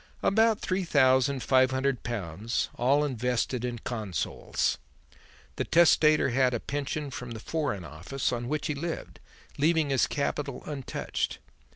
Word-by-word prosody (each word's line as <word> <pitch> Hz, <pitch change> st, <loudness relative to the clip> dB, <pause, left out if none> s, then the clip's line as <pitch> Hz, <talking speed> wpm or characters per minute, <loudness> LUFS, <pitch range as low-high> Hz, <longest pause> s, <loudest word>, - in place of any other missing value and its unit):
"About 220 Hz, +1 st, +3 dB
three 185 Hz, +1 st, -1 dB
thousand 130 Hz, -3 st, +3 dB
five 130 Hz, -1 st, +4 dB
hundred 130 Hz, -1 st, 0 dB
pounds, 105 Hz, 0 st, -3 dB
all 140 Hz, +5 st, +2 dB
invested 125 Hz, -1 st, -1 dB
in 120 Hz, -1 st, -2 dB
Consols. 105 Hz, -7 st, -2 dB, 0.8 s
The -, -, 0 dB
testator 155 Hz, -3 st, +5 dB
had 125 Hz, 0 st, +2 dB
a -, -, -1 dB
pension 145 Hz, +2 st, -3 dB
from 125 Hz, -2 st, -6 dB
the 110 Hz, -, -7 dB
Foreign 135 Hz, -, -2 dB
Office, 90 Hz, -, -3 dB
on 120 Hz, -1 st, -3 dB
which 150 Hz, +2 st, -2 dB
he 150 Hz, -, 0 dB
lived, 165 Hz, +4 st, -5 dB, 0.4 s
leaving 155 Hz, -1 st, +2 dB
his 135 Hz, -, +3 dB
capital 140 Hz, -1 st, -2 dB
untouched. 140 Hz, -4 st, -3 dB
130 Hz, 140 wpm, -28 LUFS, 120-150 Hz, 0.8 s, testator